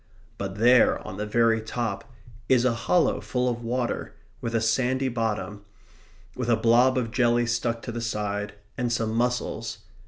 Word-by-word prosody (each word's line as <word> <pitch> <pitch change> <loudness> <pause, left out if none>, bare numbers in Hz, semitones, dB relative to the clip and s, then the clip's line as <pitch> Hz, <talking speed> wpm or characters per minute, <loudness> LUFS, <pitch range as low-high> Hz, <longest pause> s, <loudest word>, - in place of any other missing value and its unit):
But 95 -1 -4
there, 120 +3 +5
on 95 - -7
the 105 +1 -3
very 115 0 +3
top, 110 -1 -4 0.4
is 125 -1 +4
a 125 - +3
hollow 165 +9 +1
full 125 0 -1
of 120 -1 -2
water, 120 +1 -2 0.3
with 115 0 -3
a - - +3
sandy 130 +4 +1
bottom; 110 -3 -3 0.7
with 125 -1 -3
a 115 - +5
blob 120 +3 +4
of 115 -3 -1
jelly 120 0 +2
stuck 120 -1 -1
to 120 - -5
the 120 0 -4
side, 105 -2 -3 0.2
and 120 -1 0
some 115 -2 -1
mussels. 115 -1 -1
115 Hz, 165 wpm, -26 LUFS, 110-125 Hz, 0.7 s, there